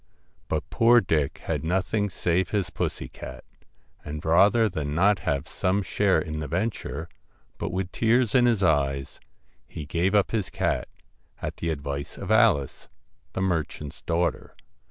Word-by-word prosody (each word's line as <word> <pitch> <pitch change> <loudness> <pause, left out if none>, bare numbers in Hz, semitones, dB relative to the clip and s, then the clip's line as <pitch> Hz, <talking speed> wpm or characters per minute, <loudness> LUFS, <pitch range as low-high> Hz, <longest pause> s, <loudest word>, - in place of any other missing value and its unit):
But 80 -1 -2
poor 120 +1 +6
Dick 80 -8 0
had - - -2
nothing 95 +5 0
save 90 0 0
his 100 -4 -1
pussy - - -3
cat, - - -9 0.6
and 75 +1 -6
rather 100 +8 +5
than 75 -6 -3
not 100 +3 +4
have 70 -3 -1
some 95 +2 0
share 95 +2 +2
in 75 -3 -4
the 75 - -4
venture, 100 +7 -3 0.5
but - - -2
with 90 -1 -3
tears 120 0 +2
in 125 -2 +5
his 115 -5 +2
eyes, 70 -5 +1 0.5
he 75 - -7
gave 85 +6 0
up 100 - +3
his 110 -5 -1
cat, - - -1 0.5
at - - -5
the 85 - -2
advice 70 -2 -4
of - - -5
Alice, 70 -2 +3 0.4
the 95 - -1
mer 85 -4 +2
chant's 75 -2 -10
daughter. 85 +1 -1
90 Hz, 155 wpm, -26 LUFS, 75-100 Hz, 0.6 s, poor